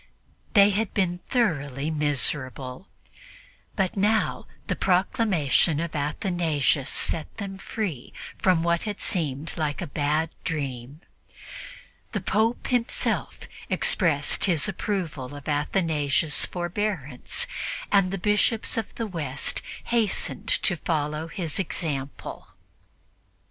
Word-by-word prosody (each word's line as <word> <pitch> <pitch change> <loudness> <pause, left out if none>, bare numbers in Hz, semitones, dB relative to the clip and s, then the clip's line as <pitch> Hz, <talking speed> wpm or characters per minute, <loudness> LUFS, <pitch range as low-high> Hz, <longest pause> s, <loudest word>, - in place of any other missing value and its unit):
They 205 -2 +7
had 205 +1 -1
been 175 -3 +1
thoroughly 150 - 0
miserable, 140 -1 -1 0.9
but 190 -3 0
now 210 +2 +1 0.2
the - - -1
proclamation 180 - +2
of 170 -1 -3
Athanasius 150 - +1
set 160 +5 0
them 195 -2 -5
free 190 - -4 0.3
from 180 -3 +3
what 170 0 +2
had 210 -2 -4
seemed 155 - -1
like 150 -2 -1
a 175 - -2
bad 150 +2 0
dream. 140 -2 -4 1.1
The 210 - 0
Pope 220 +5 +1
himself 245 -2 0 0.3
expressed 150 -6 +3
his 170 -5 +2
approval 170 -9 -3
of 145 -1 -10
Athanasius' 150 0 +1
forbearance, 175 -7 -2 0.5
and 195 -2 +5
the 195 - -2
Bishops 210 +4 +2
of 225 - -3
the 230 - -2
West 150 -9 -1 0.2
hastened 230 -4 +1
to 215 - +2
follow 155 0 -1
his 165 0 -3
example. 145 -7 -3
170 Hz, 105 wpm, -26 LUFS, 145-195 Hz, 1.1 s, They